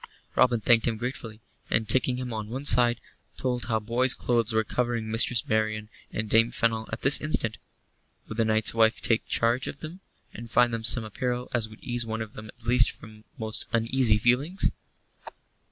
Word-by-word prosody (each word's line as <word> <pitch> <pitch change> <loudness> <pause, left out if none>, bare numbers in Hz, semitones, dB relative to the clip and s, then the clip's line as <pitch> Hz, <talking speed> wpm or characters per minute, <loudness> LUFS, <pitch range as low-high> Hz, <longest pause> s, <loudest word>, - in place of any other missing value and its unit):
Robin 125 -2 +3
thanked 115 +2 +3
him 115 -2 -1
gratefully, 115 -2 -6 0.3
and, 110 -1 0
taking 125 +2 +1
him 125 -2 -5
on 110 -1 -5
one 130 +4 -6
side, 120 -1 +4 0.4
told 125 -2 -2
how 110 -2 0
boy's 120 +4 +1
clothes 115 -2 +1
were 110 0 +1
covering 120 -1 -2
Mistress 115 +1 +2
Marian 110 -1 -1 0.2
and 110 - -3
Dame 115 +2 +3
Fennel 115 -2 -1
at 110 - -6
this 135 +2 +5
instant. 115 -8 -2 0.7
Would 110 - -8
the 115 - +2
knight's 110 0 +2
wife 110 0 +3
take 115 -1 -1
charge 120 +3 0
of 140 - -7
them, 165 +4 -8 0.3
and 115 0 -9
find 120 +1 +3
them 115 -1 -3
some 115 +1 +6
apparel 125 +3 -4
as 115 -3 0
would 110 - -16
ease 120 -1 -1
one 110 -1 -4
of 105 - -13
them 110 0 -10
at 110 - -16
least 120 +1 +4
from 110 -1 -12
most 110 -2 -2
uneasy 115 -1 +2
feelings? 130 - +1
115 Hz, 185 wpm, -26 LUFS, 110-125 Hz, 0.7 s, some